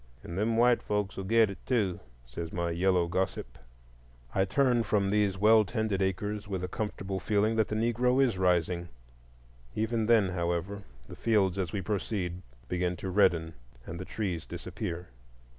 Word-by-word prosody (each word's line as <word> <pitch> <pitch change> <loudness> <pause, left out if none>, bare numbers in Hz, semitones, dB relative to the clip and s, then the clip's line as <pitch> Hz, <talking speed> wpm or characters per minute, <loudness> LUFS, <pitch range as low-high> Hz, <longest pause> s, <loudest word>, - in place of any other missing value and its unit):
"And 85 - -7
them 110 +4 +1
white 120 +1 +4
folks 105 -1 -2
will 95 - -5
get 110 0 +4
it, 100 - -11
too," 105 -9 0 0.3
said 80 +7 -6
my 85 -1 -1
yellow 90 +1 +2
gossip. 95 -6 -3 0.7
I 95 - +2
turn 120 +4 +2
from 100 -3 +1
these 105 -2 +2
well 110 +2 +6
tended 105 0 -1
acres 100 +2 -2
with 95 -3 -3
a - - -1
comfortable 95 -2 -4
feeling 110 +2 +1
that 110 - +3
the 105 - -3
Negro 120 +3 +2
is 130 -6 +3
rising. 90 -1 +1 0.9
Even 110 0 0
then, 110 -5 +4
however, 90 +3 -2 0.3
the - - -9
fields, 100 -5 +1
as 90 -4 -2
we 100 -2 -3
proceed, 95 -3 -2 0.3
begin 90 +3 -1
to 95 +1 -5
redden 85 -4 +3 0.3
and 85 0 -7
the - - -4
trees 95 -7 -3
disappear. 85 +1 -5
95 Hz, 165 wpm, -29 LUFS, 90-110 Hz, 0.9 s, well